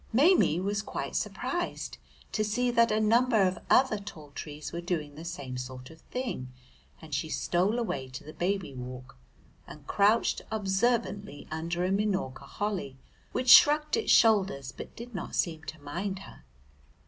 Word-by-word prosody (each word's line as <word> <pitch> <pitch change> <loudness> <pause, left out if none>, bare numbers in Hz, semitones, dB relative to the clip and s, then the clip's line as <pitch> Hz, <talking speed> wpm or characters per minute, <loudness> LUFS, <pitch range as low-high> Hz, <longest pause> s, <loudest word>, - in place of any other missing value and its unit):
Maimie 270 - +4
was 200 +2 -1
quite - - -5
surprised 350 0 -3 0.3
to 215 - 0
see 245 +4 +1
that 235 -1 +4
a 215 - +2
number 230 +2 +4
of 185 -2 +1
other 255 -5 +4
tall 155 -7 -10
trees 150 +1 -7
were 170 - -3
doing 165 -4 -3
the 155 +3 -9
same 140 -7 -5
sort 125 +1 -8
of 160 - -16
thing, 235 - -4 0.5
and 160 -2 -11
she 150 +3 -1
stole 185 +8 +1
away 140 - -2
to 130 - -8
the 155 - -10
Baby 190 -4 -1
Walk 125 0 -8 0.5
and 150 -2 -12
crouched 210 +7 +3
observantly 205 -3 -1
under 170 +3 -2
a 185 - 0
Minorca 190 -10 -1
Holly 185 -7 -3 0.3
which 255 0 -1
shrugged 300 +2 +7
its 450 - +1
shoulders 190 - +4
but - - -10
did 240 +1 -9
not 185 - -5
seem 160 -2 -1
to 155 - -7
mind 180 +7 -4
her. 195 - -13
190 Hz, 160 wpm, -29 LUFS, 150-220 Hz, 0.5 s, shrugged